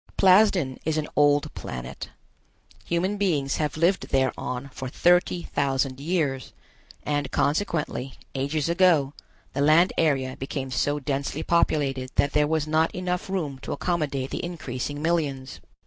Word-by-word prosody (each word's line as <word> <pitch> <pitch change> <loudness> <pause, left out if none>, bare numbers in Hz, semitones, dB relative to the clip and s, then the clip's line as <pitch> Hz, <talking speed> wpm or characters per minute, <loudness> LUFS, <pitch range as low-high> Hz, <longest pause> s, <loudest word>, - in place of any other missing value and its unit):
Plasden 185 -8 +4
is 160 0 0
an 155 - -1
old 145 0 +3
planet. 60 0 -7 0.8
Human 185 +4 0
beings 150 -9 0
have 150 -1 -2
lived 175 +4 +1
thereon 130 0 -1
for 130 - -5
thirty 175 +3 +2
thousand 135 -1 -1
years, 145 -5 -1 0.5
and 145 -2 -1
consequently, 150 -5 -1 0.2
ages 140 +3 -1
ago, 170 -5 +3 0.4
the 140 - -1
land 155 +5 +5
area 135 -5 +1
became 135 0 -5
so 145 +4 0
densely 140 +2 -3
populated 140 -6 +1
that 140 - +2
there 150 0 +3
was 155 -1 0
not 155 +1 +1
enough 180 0 -2
room 155 -9 -3
to - - -5
accommodate 145 -7 -2
the - - -3
increasing 145 -4 -4
millions. 145 -6 -1
145 Hz, 135 wpm, -25 LUFS, 135-170 Hz, 0.8 s, land